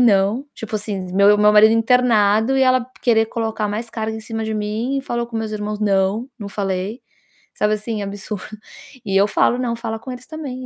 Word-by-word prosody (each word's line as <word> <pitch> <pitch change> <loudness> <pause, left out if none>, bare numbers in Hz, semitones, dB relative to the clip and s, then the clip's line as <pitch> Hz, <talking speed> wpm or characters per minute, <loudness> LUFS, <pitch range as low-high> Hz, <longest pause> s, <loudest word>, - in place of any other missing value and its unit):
não. 220 +3 +3
Tipo 220 -1 -4
assim, 200 -3 -5
meu 200 +2 +6
o 210 - 0
meu 210 0 +5
marido 215 +1 +7
internado 225 0 +3
e 265 - +3
ela 255 -2 +3 0.2
querer 225 -2 +3
colocar 220 -1 -2
mais 225 +3 -4
carga 220 -1 -3
em - - -7
cima 225 0 -4
de 220 0 -3
mim, 215 +6 -2
e: - - -5
"Falou 235 -2 -2
com 235 -1 -6
meus 220 -1 -3
irmãos?". 210 0 -3
"Não, 200 +4 +1
não 205 - -6
falei". 195 +3 -3 0.5
Sabe, 210 0 +1
assim, 215 0 -4
absurdo. 200 0 -6 0.6
E 195 - -2
eu 200 +1 +5
falo: 230 +3 +2
"Não, 240 -2 -2
fala 225 -1 -4
com 235 +4 -8
eles 250 0 -9
também, 275 -5 -6
220 Hz, 210 wpm, -20 LUFS, 210-235 Hz, 0.6 s, marido